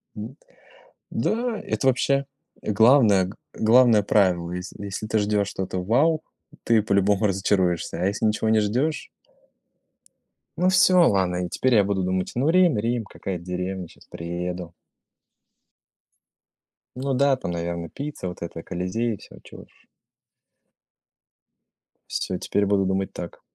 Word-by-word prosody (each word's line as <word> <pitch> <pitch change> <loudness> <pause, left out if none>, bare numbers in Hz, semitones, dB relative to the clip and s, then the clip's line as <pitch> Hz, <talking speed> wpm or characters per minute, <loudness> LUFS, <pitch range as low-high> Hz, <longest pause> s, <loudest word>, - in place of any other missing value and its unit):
М, - - -6
вот. - - -17 0.8
Да, 230 -1 -1
это 135 - -2
вообще 135 +2 +2 0.4
главное 110 -3 +4
г 95 - -9 0.2
главное 115 -2 +5
правило. 90 -5 +2
Если 90 +3 -7
если 100 +2 -5
ты 110 0 +1
ждешь 105 -1 +1
что-то 95 -2 -4
вау, 155 - +2 0.4
ты 115 -2 +3
по-любому 100 0 +2
разочаруешься, 90 -3 0
а - - +1
если 100 +3 -1
ничего 110 +1 +1
не 110 -1 +4
ждешь 125 +10 -1 1.5
Ну, 180 +1 +3
всё, 180 -1 +5
ладно, 90 -2 +1
и - - -6
теперь 130 +4 +1
я 105 - +5
буду 95 -1 -1
думать: 95 0 -1
"Ну, 135 +6 +1
Рим 180 -6 +4
Рим, 115 +2 -1
какая-то 95 -3 -6
деревня, 90 0 -4
щас - - -19
приеду". 85 0 -5 2.2
Ну 135 +1 -2
да, 140 +1 +3
там, 85 - -5
наверно, 85 0 -4
пицца, 145 -9 -6
вот 90 - -8
это, 80 -1 -6
Колизеи, 105 +6 -2
всё, - - -15
чего - - -12
уж. - - -26 2.2
Всё, 90 - -3
теперь 100 - -1
я - - 0
буду 100 -1 +2
думать 95 0 -1
так. 85 - -8
100 Hz, 140 wpm, -24 LUFS, 90-125 Hz, 2.2 s, главное